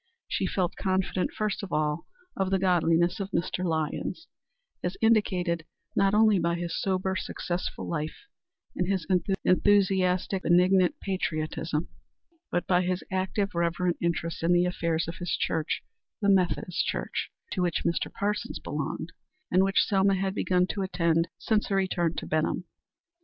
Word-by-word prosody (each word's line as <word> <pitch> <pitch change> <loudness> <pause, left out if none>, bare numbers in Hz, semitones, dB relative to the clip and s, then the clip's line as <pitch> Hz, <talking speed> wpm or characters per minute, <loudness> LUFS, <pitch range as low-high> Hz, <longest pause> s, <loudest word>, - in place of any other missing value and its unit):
She - - -1
felt 180 -2 -1
confident 190 -1 0
first 215 -1 -2
of 200 -4 -7
all 150 +1 0 0.3
of 190 -1 0
the 195 - +3
godliness 175 -1 +2
of 195 -1 -3
Mr. 185 -1 -1
Lyons 160 - -2 0.6
as 180 +1 -2
indicated 185 -7 +2 0.3
not 195 +1 +3
only 215 -2 +5
by 170 0 +1
his 170 -1 -3
sober, 190 0 0
successful 180 -1 -3
life, 155 -2 -4 0.5
and 180 - 0
his 190 -4 0 0.4
enthusiastic, 190 -1 +3
benignant 180 +1 +4
patriotism, 155 -4 -2 0.6
but 175 - -1
by 180 -1 +3
his 185 0 -1
active, 190 +2 -1
reverent 170 +1 0
interest 170 -1 -1
in 170 +2 +3
the 175 0 +4
affairs 170 -2 -1
of 165 - -5
his 175 -3 -2
church 160 -2 -1 0.4
the 200 - +2
Methodist 180 -2 +2
Church - - -2 0.2
to 185 - -1
which 175 -2 0
Mr. 170 - 0
Parsons 210 +1 -2
belonged, - - -4 0.4
and 185 +1 +5
which 195 0 +3
Selma 195 -1 +3
had 190 0 -1
begun 180 -2 +2
to 195 - -3
attend 170 -3 +1
since 215 -2 +1
her 195 - 0
return 175 -3 +1
to - - -4
Benham. 155 +3 0
180 Hz, 150 wpm, -28 LUFS, 170-195 Hz, 0.6 s, only